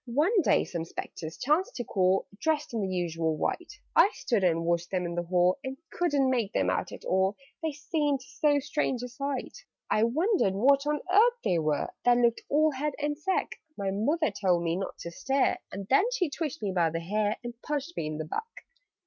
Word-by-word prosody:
"One 320 - +3
day, - - +3
some 170 -2 -4
Spectres 165 -1 -7
chanced 305 +8 +1
to 245 - -3
call, 190 -3 +2 0.2
Dressed 305 -4 0
in 225 - -1
the 195 - -1
usual 165 -3 -1
white: 350 - -2 0.2
I - - +7
stood 225 -6 0
and 165 -2 +2
watched 170 0 0
them 180 -2 -1
in 170 - -3
the 175 - -1
hall, 180 +4 +2
And 265 0 -5
couldn't 290 -6 +1
make 240 -6 0
them - - +2
out - - -2
at - - -10
all, 190 +2 +2 0.3
They 320 -2 -1
seemed 290 -2 -1
so 290 +2 +1
strange 270 -3 -1
a - - -3
sight. 275 - -4 0.3
"I 215 - +4
wondered 310 - +2
what 275 +7 +4
on 295 -1 0
earth 470 +4 +5
they 175 - +2
were, 155 -2 0
That 245 0 +5
looked 235 -1 +2
all 310 +2 +4
head 290 +2 -2
and 295 0 -1
sack; 370 +5 -1 0.2
But 195 -2 -1
Mother 290 +8 +1
told 185 -4 +1
me 165 0 0
not 195 +1 -4
to 170 - -6
stare, 270 +9 +1
And 195 +1 -6
then 275 - +4
she 365 -11 0
twitched 305 -4 -4
me 200 - 0
by 175 -3 +2
the 165 +1 -3
hair, 210 +4 0
And 240 0 -5
punched 295 +3 -3
me 155 - -2
in 155 0 -4
the 155 - -4
back. 460 - -6
240 Hz, 210 wpm, -28 LUFS, 185-295 Hz, 0.3 s, I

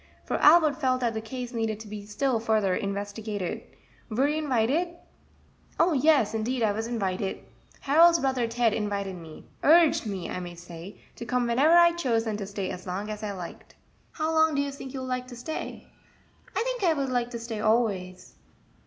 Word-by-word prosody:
for - - -1
Albert 310 -1 +5
felt 255 -2 +2
that 235 -2 0
the 220 - -3
case 245 +2 -6
needed 225 -2 -2
to 220 - -10
be 210 0 -7
still 245 +3 0
further 215 -4 +1
investigated; 205 -1 -4 0.5
"were 250 +5 +2
you 300 +1 0
inwited?" 300 +5 0 0.8
"Oh, 340 0 +4
yes, 275 -6 +3
indeed 230 +3 -1
I 215 - +3
was 220 +2 -3
invited! 195 -4 -2 0.4
Harold's 335 +4 +6
brother 260 -5 0
Ted 230 -1 +1
invited 200 -3 -2
me 165 -3 -11 0.2
urged 315 -5 +5
me, 195 -4 -4
I - - -4
may 175 -1 -7
say, 170 +2 -11 0.2
to - - -6
come 245 +2 0
whenever 270 +8 +4
I 345 0 +7
chose, 250 -10 0
and 215 -2 -2
to 200 - -5
stay 200 -1 -4
as 180 +1 -8
long 200 +4 -3
as 210 0 -6
I 210 -1 -3
liked." 180 -3 -9 0.4
"How 315 0 -1
long 315 -1 +3
do 280 - +2
you 285 - -4
sink 270 -1 -9
you 265 -1 -5
will 260 - -5
like 255 0 -3
to 250 - -9
stay?" 280 +7 -6 0.7
"I - - +2
think - - -3
I 335 -3 +3
would 275 -2 -1
like 245 -1 0
to 235 -1 -6
stay 230 -2 -5
always." 200 -5 0
235 Hz, 195 wpm, -27 LUFS, 205-280 Hz, 0.8 s, I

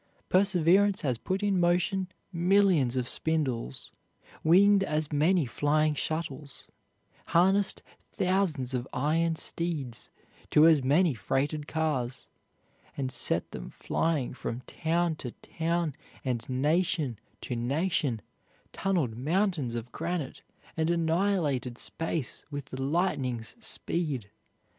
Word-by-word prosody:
Perseverance 190 +1 +4
has 130 -7 -1
put 190 +6 -2
in 200 -2 +2
motion 180 +2 +2 0.3
millions 175 -7 +3
of 125 -1 -1
spindles, 130 - -1 0.5
winged 195 +4 +6
as 155 -3 -1
many 160 +3 +3
flying 150 +4 +1
shuttles, 150 -3 -4 0.6
harnessed 190 +3 +3 0.3
thousands 180 -9 0
of 125 0 -2
iron 160 +5 +1
steeds 155 -8 -3 0.4
to 150 - +6
as 160 -5 +6
many 150 +5 +4
freighted 140 - -1
cars, 145 -6 -1 0.7
and 130 -2 -2
set - - -1
them - - -7
flying 155 -6 -1
from 125 -1 -5
town 165 +4 0
to 125 -5 -6
town 165 -1 -2 0.3
and 120 -2 -2
nation 145 - +1 0.2
to 125 - -4
nation, 135 - 0 0.5
tunneled 170 - 0
mountains 155 - 0
of 120 +1 -5
granite, 165 -4 -3 0.3
and 160 0 0
annihilated 165 -7 +1
space 165 -2 -3
with 145 -2 -5
the 130 - -7
lightning's 130 -7 -1
speed. 140 - -2
155 Hz, 110 wpm, -29 LUFS, 130-175 Hz, 0.7 s, winged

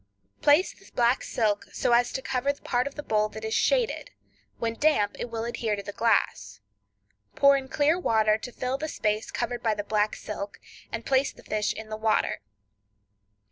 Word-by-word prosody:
Place 295 +6 +4
the 390 - -19
black 240 +1 +3
silk 210 -3 0
so - - 0
as 240 +1 +4
to 265 - -3
cover 265 +1 0
the 285 - -14
part 250 +1 0
of 280 - -7
the 295 - -6
bowl 215 -3 +1
that 220 +1 -7
is 220 - -2
shaded; - - +1 0.5
when 230 -1 -1
damp 230 -6 +2
it 240 - -4
will 230 0 -3
adhere 230 -2 -1
to 200 - -6
the 205 - -6
glass. 110 - 0 0.8
Pour 280 0 +6
in 270 -1 -2
clear 300 +5 +2
water 220 -8 +3
to 245 - -7
fill 255 +2 -3
the 310 - -2
space 215 -6 -1
covered 240 -1 -3
by 220 -3 +1
the 205 - -3
black 210 0 +1
silk, 205 -1 -6 0.3
and 230 0 -5
place 270 +1 +2
the - - -17
fish 210 -2 -1
in 220 0 -7
the 215 - -4
water. 220 0 +1
230 Hz, 195 wpm, -27 LUFS, 215-270 Hz, 0.8 s, Pour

